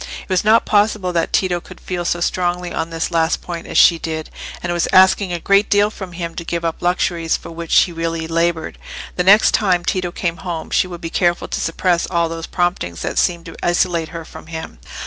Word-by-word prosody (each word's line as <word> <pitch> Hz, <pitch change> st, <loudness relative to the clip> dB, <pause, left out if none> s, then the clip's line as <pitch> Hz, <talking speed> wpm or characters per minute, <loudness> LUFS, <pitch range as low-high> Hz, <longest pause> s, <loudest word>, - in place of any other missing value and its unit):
It -, -, -20 dB
was 185 Hz, -2 st, +1 dB
not 220 Hz, +2 st, +4 dB
possible 205 Hz, -3 st, +1 dB
that 165 Hz, -1 st, 0 dB
Tito 180 Hz, -2 st, +1 dB
could -, -, -13 dB
feel 175 Hz, -1 st, -4 dB
so 175 Hz, 0 st, -1 dB
strongly 180 Hz, 0 st, -1 dB
on 160 Hz, +1 st, -2 dB
this 165 Hz, +1 st, -3 dB
last 165 Hz, 0 st, +1 dB
point 170 Hz, -2 st, -6 dB
as -, -, -2 dB
she 170 Hz, -2 st, +6 dB
did, 160 Hz, -1 st, -5 dB, 0.3 s
and 175 Hz, -, -2 dB
it -, -, 0 dB
was 175 Hz, -, 0 dB
asking 190 Hz, 0 st, +5 dB
a 175 Hz, -, -1 dB
great 200 Hz, +4 st, +3 dB
deal 205 Hz, 0 st, +3 dB
from 190 Hz, -4 st, -8 dB
him 170 Hz, -1 st, -5 dB
to 170 Hz, -, -4 dB
give 170 Hz, 0 st, -3 dB
up 165 Hz, -, -3 dB
luxuries 175 Hz, -2 st, 0 dB
for -, -, -11 dB
which 165 Hz, 0 st, +3 dB
he 180 Hz, -, -5 dB
really 165 Hz, -1 st, -3 dB
laboured. 165 Hz, 0 st, -1 dB, 0.4 s
The 180 Hz, -, 0 dB
next 200 Hz, +4 st, +6 dB
time 180 Hz, -4 st, +2 dB
Tito 180 Hz, -2 st, -1 dB
came 170 Hz, -1 st, -2 dB
home 170 Hz, -3 st, -5 dB
she -, -, +2 dB
would 175 Hz, -2 st, -8 dB
be 165 Hz, -, -5 dB
careful 175 Hz, -1 st, +1 dB
to -, -, -3 dB
suppress 170 Hz, +1 st, 0 dB
all 170 Hz, -2 st, 0 dB
those 165 Hz, 0 st, -6 dB
promptings 175 Hz, -, -2 dB
that -, -, -1 dB
seemed 170 Hz, -2 st, 0 dB
to -, -, -9 dB
isolate 175 Hz, -2 st, +1 dB
her 165 Hz, -1 st, -7 dB
from -, -, -12 dB
him. 160 Hz, -, -7 dB
175 Hz, 225 wpm, -19 LUFS, 165-185 Hz, 0.4 s, she